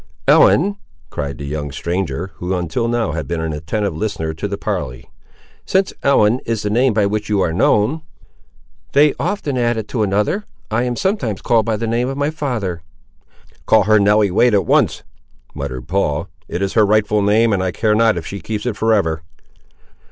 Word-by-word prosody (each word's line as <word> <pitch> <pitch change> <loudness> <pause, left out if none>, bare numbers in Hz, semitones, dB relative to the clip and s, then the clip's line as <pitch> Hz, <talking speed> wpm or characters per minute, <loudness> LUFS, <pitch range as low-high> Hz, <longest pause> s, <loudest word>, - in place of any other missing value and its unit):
"Ellen!" 200 +6 +5 0.3
cried 70 -1 -4
the 70 - -7
young 75 0 -4
stranger, 85 +1 -3
who 90 +2 -2
until 90 +7 -2
now 115 -6 0
had 75 -3 -4
been 85 +2 -2
an 80 -1 -2
attentive 85 +8 -2
listener 80 -7 -3
to 80 +6 -4
the 100 0 -4
parley, 75 - -4 0.6
"since 190 0 +1
Ellen 125 -4 +3
is 115 -2 -2
the 105 - -1
name 120 +1 +2
by 105 -2 +3
which 105 +1 -2
you 105 -2 +1
are 80 -3 0
known—" 105 - +2 0.9
"They 145 +1 +5
often 150 -11 -2
add 120 -3 0
to 120 - -2
it - - +3
another. 105 - 0 0.3
I 115 +3 +1
am 125 -1 -2
sometimes 125 - -2
called 115 -2 +2
by 110 -1 0
the 115 - -3
name 120 +3 0
of 135 - -4
my 145 +1 0
father." 120 - -3 0.9
"Call 110 -2 +5
her 110 +2 +4
Nelly 105 0 +3
Wade 120 +4 +3
at 100 - +2
once," - - +2 0.5
muttered 65 -3 -6
Paul; 85 -3 0 0.2
"it 90 - -3
is 95 - -2
her 110 - +4
rightful 105 0 +2
name, 110 +2 +3
and 95 - +1
I 95 -1 -1
care 110 +3 +1
not 110 -2 +3
if 80 - -5
she 100 +3 -6
keeps 105 0 -4
it 120 -4 -1
for 110 +2 +3
ever!" 80 -6 0
105 Hz, 195 wpm, -18 LUFS, 90-115 Hz, 0.9 s, Ellen